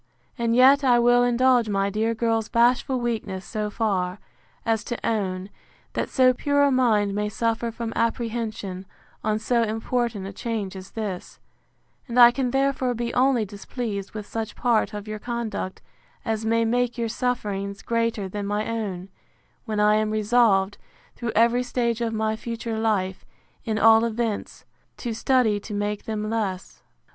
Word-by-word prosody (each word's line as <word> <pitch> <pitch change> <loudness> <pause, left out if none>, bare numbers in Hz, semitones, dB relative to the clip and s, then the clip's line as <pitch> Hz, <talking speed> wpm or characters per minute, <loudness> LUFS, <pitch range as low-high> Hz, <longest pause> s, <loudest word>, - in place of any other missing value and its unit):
And 235 -2 0
yet 270 +3 +6
I 250 -2 +5
will 245 +1 +5
indulge 245 -1 +3
my 195 0 0
dear 220 +3 0
girl's 225 -1 0
bashful 250 +2 +2
weakness 215 -6 -3
so 210 -1 -3
far, 195 -4 -1 0.5
as 225 -2 +1
to 240 - -3
own, 195 -3 -2 0.4
that - - -2
so 255 -1 +4
pure 285 +3 +1
a 285 - +4
mind 220 -6 +2
may 210 +1 -1
suffer 230 +2 -1
from 230 0 -5
apprehension, 225 -5 -2 0.4
on 215 0 +1
so 235 +2 +1
important 225 -1 -1
a 195 - -7
change 215 -3 -4
as 190 0 -9
this; 200 -5 -5 0.7
and 245 0 0
I 240 0 +10
can 255 0 -1
therefore 270 -1 +1
be 235 +1 -3
only 250 -3 +3
displeased 205 0 -5
with 215 -1 -6
such 225 0 -5
part 235 -3 +1
of 205 0 -6
your 215 0 -5
conduct, 230 -5 -4 0.4
as 220 -1 -1
may 230 0 +2
make 245 +1 0
your 230 -1 -1
sufferings 205 -5 -3
greater 230 -3 -1
than 200 +1 -4
my 210 +1 -1
own; 195 -5 -4 0.6
when 215 -2 -2
I 210 0 +4
am 215 0 0
resolved, 215 -2 +2 0.4
through 235 -2 -4
every 235 +2 +4
stage 240 -2 -1
of 230 -1 0
my 220 0 0
future 230 0 -4
life, 195 -4 0 0.4
in 220 -1 -1
all 225 0 +6
events, 230 -2 -3 0.3
to 240 -2 -4
study 230 -3 +2
to 210 +1 -7
make 205 0 -2
them 215 -1 -3
less. 210 -5 -3
225 Hz, 160 wpm, -24 LUFS, 210-240 Hz, 0.7 s, I